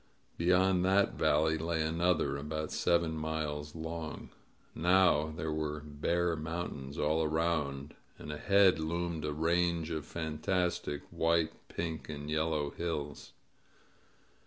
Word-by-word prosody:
Beyond 90 Hz, +1 st, +3 dB
that 95 Hz, +2 st, +3 dB
valley 80 Hz, +1 st, +2 dB
lay 80 Hz, 0 st, 0 dB
another, 85 Hz, -1 st, +1 dB
about 75 Hz, +2 st, -4 dB
seven 85 Hz, -2 st, +2 dB
miles 75 Hz, -1 st, -3 dB
long. 80 Hz, 0 st, -6 dB, 0.4 s
Now 85 Hz, -3 st, +4 dB
there 80 Hz, 0 st, -4 dB
were 75 Hz, -1 st, -2 dB
bare 85 Hz, +4 st, 0 dB
mountains 80 Hz, -3 st, -5 dB
all 80 Hz, +2 st, +2 dB
around, 75 Hz, -3 st, -1 dB, 0.2 s
and 75 Hz, -, -7 dB
ahead 95 Hz, +3 st, +4 dB
loomed 85 Hz, 0 st, -2 dB
a 75 Hz, -, -1 dB
range 85 Hz, +1 st, +1 dB
of 80 Hz, -2 st, -2 dB
fantastic 85 Hz, -1 st, -1 dB
white, 80 Hz, -1 st, +2 dB, 0.2 s
pink, 80 Hz, -2 st, -4 dB
and 75 Hz, 0 st, -5 dB
yellow 75 Hz, -2 st, 0 dB
hills. 75 Hz, -4 st, -4 dB
80 Hz, 115 wpm, -32 LUFS, 75-85 Hz, 0.4 s, Now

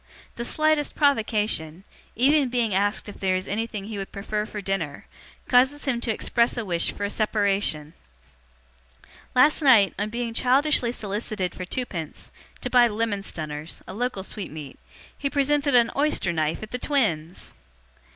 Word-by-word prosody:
The 235 Hz, -, -4 dB
slightest 310 Hz, +3 st, +1 dB
provocation, 215 Hz, -, +1 dB, 0.3 s
even 275 Hz, +3 st, +3 dB
being 235 Hz, -4 st, 0 dB
asked 205 Hz, +3 st, 0 dB
if 205 Hz, -, -9 dB
there 190 Hz, -1 st, +1 dB
is 185 Hz, 0 st, -3 dB
anything 215 Hz, -1 st, -3 dB
he 210 Hz, -1 st, -5 dB
would 195 Hz, -, -6 dB
prefer 210 Hz, +1 st, -3 dB
for 210 Hz, -, -6 dB
dinner, 190 Hz, -7 st, -3 dB, 0.4 s
causes 265 Hz, +3 st, +3 dB
him 245 Hz, -4 st, 0 dB
to 235 Hz, -, -1 dB
express 235 Hz, +2 st, +1 dB
a 235 Hz, -, -2 dB
wish 170 Hz, -3 st, 0 dB
for 205 Hz, -, -7 dB
a 200 Hz, -, 0 dB
separation. 200 Hz, -8 st, 0 dB, 1.4 s
Last 290 Hz, +6 st, +5 dB
night, 235 Hz, -9 st, +6 dB
on 205 Hz, +1 st, -1 dB
being 235 Hz, 0 st, -3 dB
childishly 260 Hz, 0 st, +3 dB
solicited 205 Hz, -4 st, -3 dB
for 180 Hz, -, -6 dB
twopence, 180 Hz, -, -5 dB, 0.3 s
to -, -, -3 dB
buy 245 Hz, -1 st, +6 dB
'lemon 215 Hz, -2 st, -1 dB
stunners' 155 Hz, -4 st, -6 dB
a -, -, -7 dB
local 235 Hz, -2 st, -2 dB
sweetmeat 155 Hz, -9 st, -8 dB, 0.4 s
he 280 Hz, -, -2 dB
presented 285 Hz, 0 st, +1 dB
an 235 Hz, -1 st, +4 dB
oyster 280 Hz, -, +1 dB
knife 155 Hz, +3 st, -1 dB
at 215 Hz, -, -9 dB
the 250 Hz, -, -3 dB
twins! 185 Hz, -, -1 dB
215 Hz, 155 wpm, -25 LUFS, 190-250 Hz, 1.4 s, night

